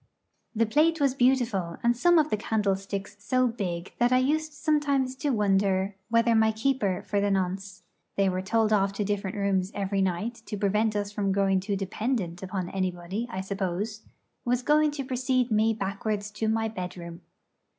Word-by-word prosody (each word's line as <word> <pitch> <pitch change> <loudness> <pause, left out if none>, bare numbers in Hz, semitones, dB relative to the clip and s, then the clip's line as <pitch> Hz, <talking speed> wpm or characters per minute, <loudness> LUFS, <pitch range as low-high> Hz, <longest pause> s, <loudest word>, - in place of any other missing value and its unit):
The 230 +1 +3
plate 315 +8 +2
was 280 -3 +3
beautiful; 245 -10 +1
and 240 0 +3
some 345 +7 +4
of 310 -1 +3
the - - +3
candlesticks 200 -2 -2
so 255 +5 +2
big 185 -6 -4
that 240 +1 +3
I 255 - +5
used 310 +4 +1
sometimes 290 -4 0
to 295 - -1
wonder 195 -3 +2 0.2
whether 230 0 +3
my 220 0 +4
keeper 220 -5 0
for 200 0 0
the 205 - +1
nonce 195 +1 -2 0.3
they 195 -1 +2
were 185 0 0
told 220 +2 +1
off 200 -1 +2
to 205 - -2
different 200 -1 -2
rooms 195 -1 0
every 195 0 -1
night, 195 +6 -2
to 210 - -4
prevent 210 +2 +1
us 205 -1 -2
from 205 -2 -1
growing 195 -1 +2
too 200 +2 -2
dependent 195 -2 -2
upon 185 -1 -4
anybody, 185 +3 -3
I 190 -4 -4
suppose 195 +2 -3 0.4
was 245 +1 0
going 305 +2 +4
to 290 -2 -5
precede 255 -1 0
me 215 +1 +3
backwards 205 0 -3
to 215 +1 -2
my 225 0 +1
bedroom. 180 -4 -7
210 Hz, 175 wpm, -27 LUFS, 195-240 Hz, 0.4 s, I